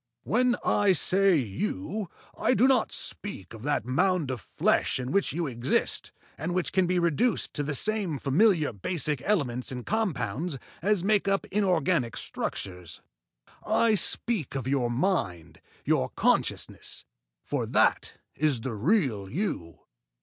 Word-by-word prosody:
When 245 +3 +2
I 205 -2 +4
say 190 +2 +3
you 125 - -2 0.3
I 255 - +2
do 255 - +5
not 260 -4 +3
speak 115 - -6
of 110 - -10
that 145 -4 -1
mound 150 +3 +1
of 125 -5 -5
flesh - - +1
in 125 0 -4
which 200 +1 +2
you 170 +2 -2
exist, 120 -3 -1 0.3
and 175 +4 -2
which 185 - 0
can 190 -2 +3
be 180 +1 +1
reduced 175 - +1
to - - -2
the 145 0 -2
same 205 -4 0
familiar 155 - +3
basic 150 - -2
elements 135 - 0
and 125 -2 -6
compounds 155 - -1 0.2
as 200 0 +2
make 205 0 +2
up 195 0 +1
inorganic 175 - +1
structures; 90 -3 -5 0.6
I 230 -1 +3
speak 205 - +1
of 130 -2 -3
your 130 -3 +1
mind, 100 - -1 0.2
your - - +2
consciousness - - -1 0.4
for - - -2
that - - +2 0.2
is 145 -6 +1
the 130 0 -3
real 115 - +1
you. 130 - -3
155 Hz, 140 wpm, -27 LUFS, 125-195 Hz, 0.6 s, do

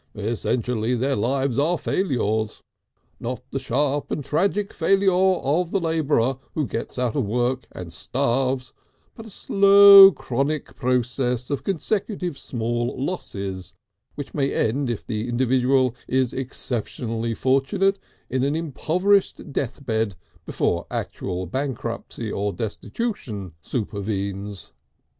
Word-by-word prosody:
Essentially 115 +2 -1
their 135 +3 0
lives 130 +4 0
are 165 +5 +2
failures, 110 - -1 0.6
not - - -4
the - - -2
sharp 145 +3 0
and 145 - -3
tragic 195 +7 0
failure 195 +3 +3
of 180 -3 +2
the 195 - +1
labourer 150 -6 +1 0.2
who 155 - 0
gets 115 - -5
out 125 -3 0
of - - +1
work 125 +3 0
and 85 -2 -8
starves, 130 - -1 0.4
but 225 -1 -11
a - - -9
slow, 200 0 +8
chronic 140 0 -2
process 125 0 0
of 140 - -2
consecutive 195 -2 -1
small 120 -2 -2
losses 100 - -5 0.4
which 145 -1 -7
may 140 -2 0
end 130 +4 0
if 120 - -4
the 110 0 -3
individual 130 +1 +2
is 130 -1 +1
exceptionally 115 -3 -3
fortunate 185 - +1 0.3
in 130 0 -1
an 140 +2 +1
impoverished 170 +2 0
death 135 +1 -3
bed 110 -4 0 0.3
before - - -1
actual 90 +1 -4
bankruptcy 115 - -4
or 100 +1 -1
destitution 105 - -4
supervenes. 100 -3 -4
130 Hz, 120 wpm, -23 LUFS, 115-155 Hz, 0.6 s, slow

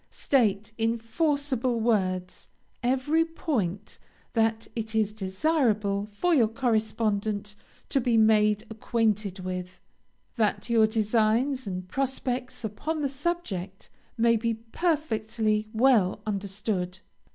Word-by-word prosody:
State, 215 -5 +1
in 225 +1 +1
forcible 260 -1 0
words, 185 -5 -1 0.3
every 265 +6 +2
point 220 - -3 0.3
that 225 -1 +1
it 220 -1 -4
is 215 -1 +1
desirable 210 -1 0
for 345 +13 +1
your 245 -8 +5
correspondent 215 -3 -1 0.3
to 275 - +1
be 235 -1 +2
made 215 -1 +4
acquainted 215 -3 0
with, 185 0 -5 0.6
that 225 +1 0
your 225 -2 +5
designs 225 +4 +1
and 185 -1 -4
prospects 255 +1 -2
upon 300 +9 -3
the - - +2
subject 265 - -4 0.3
may 230 0 +4
be 230 0 0
perfectly 225 -5 -1
well 220 -5 +3
understood. 195 -2 -2
220 Hz, 105 wpm, -27 LUFS, 205-250 Hz, 0.6 s, your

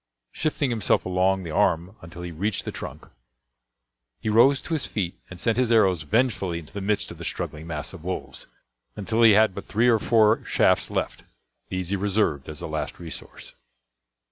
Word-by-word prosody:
Shifting 145 -4 -1
himself 115 -3 +1
along 95 +1 +1
the 85 - -6
arm 90 +3 +1
until 85 +1 -10
he 90 - -5
reached 95 +5 -2
the - - -3
trunk, - - -8 1.1
he - - -3
rose 125 +6 +5
to 170 - -5
his 155 - -1
feet 90 -5 -2 0.2
and 90 - -10
sent 115 +4 0
his 125 -2 +2
arrows 95 -7 +4
vengefully 100 - 0
into 80 -3 -10
the 100 - -5
midst 105 +1 0
of - - -11
the - - -7
struggling 75 +2 -4
mass 80 0 -5
of 90 -4 -11
wolves 95 +1 -5 0.5
until 110 +3 -1
he 115 -2 +8
had 110 -1 +4
but - - -7
three 115 +4 +2
or 115 -2 +4
four 110 0 +3
shafts - - +2
left. - - -3 0.5
These 95 -1 -3
he - - +2
reserved 95 -8 0
as 75 - -8
a - - -4
last - - -4
resource. 85 -2 -9
95 Hz, 190 wpm, -25 LUFS, 85-110 Hz, 1.1 s, he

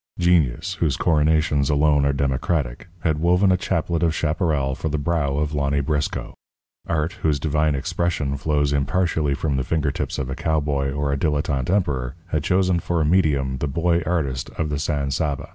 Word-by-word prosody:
Genius, 85 -1 +2
whose 75 -5 +1
coronations 75 -3 +2
alone 75 -1 +3
are - - +3
democratic, 70 0 -1
had 80 -2 0
woven 90 +4 +3
a - - +4
chaplet 85 -2 -1
of 80 -2 +1
chaparral 75 -4 0
for 80 - -3
the 75 - -1
brow 70 -2 0
of 75 0 -1
Lonny 70 -1 0
Briscoe. 75 +1 -2 0.5
Art, 80 0 -1
whose 75 -3 +1
divine 75 0 +1
expression 70 0 -1
flows 75 0 0
impartially 75 0 +1
from 70 -1 -1
the 65 - 0
fingertips 75 0 -1
of 70 - -2
a 65 - -3
cowboy 70 -3 0
or 70 0 -1
a - - 0
dilettante 70 -3 -1
emperor, 70 -10 0
had 75 -4 -1
chosen 90 +1 +2
for 85 0 -1
a 80 - +2
medium 75 -6 +2
the 75 - -1
Boy 85 +4 +1
Artist 75 -7 -2
of 80 -2 -1
the 75 -1 -2
San 70 -2 -1
Saba. 70 0 -2
75 Hz, 180 wpm, -22 LUFS, 70-80 Hz, 0.5 s, a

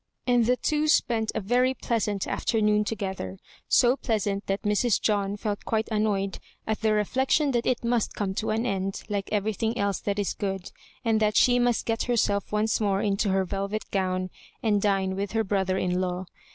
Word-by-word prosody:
And 245 -2 +3
the 250 +1 +3
two 305 +2 0
spent 230 -7 +2
a - - +1
very 250 +5 +2
pleasant 210 -5 -1
afternoon 210 -2 +1
together, 190 - -4 0.2
— - - -30
so 245 +1 +4
pleasant 205 -6 -2
that 195 +1 -1
Mrs. 210 +2 +2
John 205 -1 0
felt 205 -1 -3
quite 220 -1 -1
annoyed 205 -2 0 0.3
at 220 -1 -2
the 220 -1 +2
reflection 265 +7 +2
that 240 -2 0
it 250 -1 0
must 235 -2 0
come 195 -2 -2
to 215 - -2
an 225 +2 0
end 195 -3 -2
like 200 -1 -2
everything 220 +3 -1
else 200 -3 0
that 200 0 -2
is 205 -2 0
good, 195 -2 -4 0.3
and 225 -1 +3
that 215 -1 +2
she 245 -1 +5
must 245 -1 +1
get 225 0 -1
herself 205 -4 +1
once 215 +1 +1
more 200 -2 +1
into 200 0 +1
her 190 0 +2
velvet 200 +3 -3
gown 185 -1 -1 0.3
and 210 -3 +2
dine 195 -2 +1
Dfith 200 +1 -3
her 225 0 +2
brother 190 -2 0
hi - - -1
law. 180 0 -1
210 Hz, 190 wpm, -26 LUFS, 195-225 Hz, 0.3 s, she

